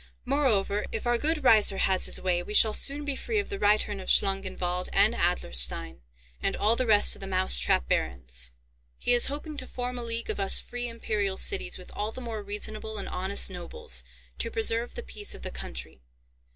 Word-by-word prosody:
"Moreover, 220 Hz, -7 st, 0 dB
if 225 Hz, -, -5 dB
our 240 Hz, -1 st, +1 dB
good 310 Hz, +1 st, -1 dB
Raiser 215 Hz, -5 st, +5 dB
has 190 Hz, -1 st, +4 dB
his -, -, +1 dB
way, 180 Hz, -2 st, 0 dB
we 210 Hz, +4 st, -6 dB
shall 220 Hz, 0 st, +6 dB
soon 285 Hz, +5 st, +4 dB
be 285 Hz, -2 st, -3 dB
free 445 Hz, -, -3 dB
of 405 Hz, -, -2 dB
the 400 Hz, -, -5 dB
reitern 205 Hz, -1 st, +1 dB
of 185 Hz, -, -6 dB
Schlangenwald, 185 Hz, -2 st, +1 dB
and 215 Hz, +3 st, +3 dB
Adlerstein, 65 Hz, -, -1 dB, 0.4 s
and -, -, -1 dB
all 220 Hz, +2 st, +2 dB
the 255 Hz, 0 st, -2 dB
rest 210 Hz, -2 st, +6 dB
of -, -, -14 dB
the 195 Hz, -, -7 dB
mouse 185 Hz, -, 0 dB
trap -, -, +1 dB
barons. 65 Hz, -1 st, -1 dB, 0.5 s
He 245 Hz, -, +1 dB
is 240 Hz, -, +6 dB
hoping 295 Hz, +2 st, -6 dB
to 260 Hz, -, -5 dB
form 250 Hz, 0 st, -5 dB
a -, -, -5 dB
league 230 Hz, 0 st, -1 dB
of -, -, -6 dB
us 195 Hz, -1 st, +5 dB
free 245 Hz, 0 st, -5 dB
imperial 210 Hz, -4 st, -3 dB
cities 400 Hz, -1 st, 0 dB
with -, -, -13 dB
all 210 Hz, +1 st, -3 dB
the 255 Hz, -, -9 dB
more 230 Hz, -4 st, -6 dB
reasonable 215 Hz, +1 st, -3 dB
and 200 Hz, -, -5 dB
honest 190 Hz, +2 st, +1 dB
nobles, 470 Hz, -1 st, -2 dB, 0.4 s
to -, -, -2 dB
preserve 240 Hz, -, -1 dB
the 475 Hz, -, -6 dB
peace 415 Hz, -2 st, -1 dB
of -, -, -13 dB
the -, -, -6 dB
country. 65 Hz, 0 st, -8 dB
215 Hz, 205 wpm, -27 LUFS, 190-250 Hz, 0.5 s, shall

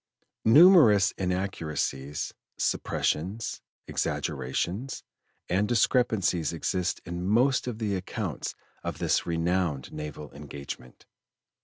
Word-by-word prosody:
Numerous 115 Hz, -, +7 dB
inaccuracies, 80 Hz, -7 st, -2 dB, 0.2 s
suppressions, 95 Hz, +9 st, -1 dB, 0.3 s
exaggerations, 90 Hz, -, -2 dB, 0.4 s
and 100 Hz, +3 st, +1 dB
discrepancies 110 Hz, -, +2 dB
exist 90 Hz, +2 st, -1 dB
in 85 Hz, +1 st, -4 dB
most 125 Hz, +6 st, +3 dB
of 120 Hz, -3 st, -3 dB
the 105 Hz, -3 st, -1 dB
accounts 95 Hz, 0 st, -4 dB, 0.3 s
of -, -, -4 dB
this -, -, +1 dB
renowned 85 Hz, -4 st, 0 dB
naval 75 Hz, -2 st, -7 dB
engagement. 70 Hz, -3 st, -9 dB
90 Hz, 90 wpm, -28 LUFS, 75-110 Hz, 0.4 s, Numerous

